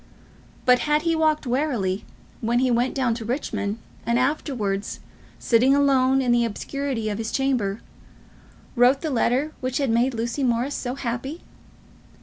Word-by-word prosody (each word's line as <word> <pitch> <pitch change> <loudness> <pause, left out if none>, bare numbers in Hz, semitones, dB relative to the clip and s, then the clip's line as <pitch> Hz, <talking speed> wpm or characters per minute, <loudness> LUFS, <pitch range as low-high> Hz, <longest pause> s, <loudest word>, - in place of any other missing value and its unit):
But 250 -1 +5
had 300 +1 +3
he 330 -1 +1
walked 310 -2 +1
warily 240 -8 -1 0.3
when 235 +2 0
he 255 0 +2
went 240 +2 +1
down 255 -4 +1
to 225 0 -5
Richmond, 220 -4 -2 0.3
and 235 0 +1
afterwards, 245 -7 -1 0.4
sitting 255 +4 +3
alone 270 -1 +3
in 245 - +2
the 240 0 +4
obscurity 240 +1 -3
of 205 +1 -3
his 225 0 -3
chamber, 245 -7 0 0.9
wrote 250 +3 +4
the 315 - -2
letter 260 +4 +1
which 255 0 -1
had 275 -5 0
made 240 +2 +2
Lucy 235 +5 -2
Morris 245 +3 +1
so 250 -1 -3
happy? 265 +5 -4
250 Hz, 150 wpm, -24 LUFS, 235-275 Hz, 0.9 s, But